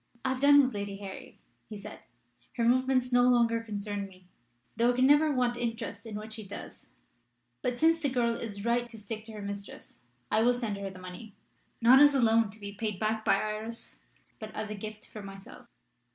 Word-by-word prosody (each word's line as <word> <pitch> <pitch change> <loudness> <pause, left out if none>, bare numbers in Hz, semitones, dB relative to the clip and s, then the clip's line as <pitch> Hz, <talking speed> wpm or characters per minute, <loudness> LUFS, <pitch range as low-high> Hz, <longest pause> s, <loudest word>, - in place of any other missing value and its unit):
'I - - +2
have 260 0 -2
done 285 0 +7
with 260 - -3
Lady 200 -1 -4
Harry,' 195 -1 -9 0.3
he 215 - -7
said. 200 - -9 0.5
'Her 235 - 0
movements 255 +1 +2
no 245 - +6
longer 230 -2 +3
concern 205 -2 -4
me, 185 -1 -18 0.5
though 235 +2 +3
I - - -2
can 255 +1 +4
never 295 +2 +5
want 250 -3 +1
interest 230 -1 -4
in 215 - -6
what 215 +1 -6
she 220 -1 -6
does. 195 - -10 0.7
But 250 -1 -1
since 330 +3 +4
the 285 - +1
girl 240 -2 +1
is 205 -3 -6
right 240 0 +1
to 225 - -11
stick 215 +1 -6
to 225 - -10
her 210 -1 -7
mistress, 200 0 -8 0.3
I 220 - +3
will 245 +2 +4
send 225 -5 -3
her 200 0 -4
the 185 - -11
money 185 +3 -10 0.5
not 245 +3 +8
as 290 0 +7
a - - +3
loan 225 -2 +4
to 215 +3 -10
be 200 -1 -7
paid 210 -1 -3
back 220 0 0
by - - +4
Iris, 215 +2 -4 0.4
but 215 -1 -7
as 215 0 -4
a - - -3
gift 215 +1 -8
from 210 -2 -9
myself.' 195 0 -12
225 Hz, 210 wpm, -30 LUFS, 205-245 Hz, 0.7 s, not